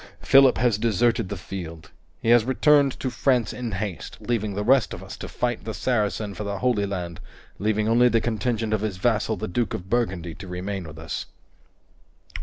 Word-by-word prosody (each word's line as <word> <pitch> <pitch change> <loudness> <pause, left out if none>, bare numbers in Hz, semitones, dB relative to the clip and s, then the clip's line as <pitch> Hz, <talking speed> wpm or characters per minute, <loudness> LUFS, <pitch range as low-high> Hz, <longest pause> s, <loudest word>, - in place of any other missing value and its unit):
Philip 135 -1 +6
has 115 -3 +2
deserted 115 -1 +1
the 100 - -4
field. 85 -3 -8 0.3
He 115 - +1
has 120 -1 +6
returned 140 +2 +3
to 130 - -1
France 125 -1 +1
in 120 -4 -5
haste, 100 -4 -4
leaving 110 -4 -2
the 105 - -1
rest 130 +2 +3
of - - -10
us - - -8
to - - -7
fight 120 -2 -2
the 110 -1 -5
Saracen 105 -4 -1
for 105 - -5
the 100 -1 -3
Holy 115 -5 +1
Land 90 -4 -5 0.4
leaving 110 +1 +1
only 120 +2 +5
the 115 - +3
contingent 115 -1 -1
of 110 - +1
his 105 -4 -2
vassal 110 +2 +1
the 90 - -4
Duke 115 +4 -1
of 95 -3 -8
Burgundy 95 -8 -1
to 95 +3 -10
remain 90 +1 -4
with 80 0 -10
us." 80 0 -5
110 Hz, 195 wpm, -24 LUFS, 95-120 Hz, 0.4 s, Philip